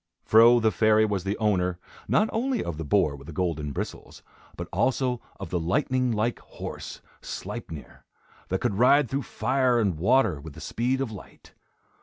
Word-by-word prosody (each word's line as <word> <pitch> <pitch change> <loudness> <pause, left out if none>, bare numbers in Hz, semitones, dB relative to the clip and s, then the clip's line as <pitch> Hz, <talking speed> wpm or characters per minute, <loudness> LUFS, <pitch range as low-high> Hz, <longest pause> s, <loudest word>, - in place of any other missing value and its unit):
Fro 115 +2 +6
the 110 -1 +2
fairy 110 +2 +4
was 100 -4 -2
the 100 +1 -1
owner, 90 -5 +1 0.3
not 215 - +3
only 250 +3 0
of 85 -3 -5
the - - -3
boar 70 0 +2
with 70 +1 -13
the - - -7
golden 75 -4 -2
bristles, - - -7 0.3
but - - -5
also 130 -2 0 0.2
of 95 -4 -7
the 90 - 0
lightning 130 - 0
like 115 +2 -1
horse, - - -8 0.2
Sleipnir, 80 -3 -8 0.4
that 95 - -2
could 110 -5 -1
ride 130 +1 +4
through 135 +1 0
fire 130 -3 +1
and 95 -8 0
water 95 - +2
with 80 0 -10
the - - -11
speed 125 +3 -1
of 130 -5 -2
light. 105 - -13
110 Hz, 175 wpm, -26 LUFS, 90-125 Hz, 0.4 s, Fro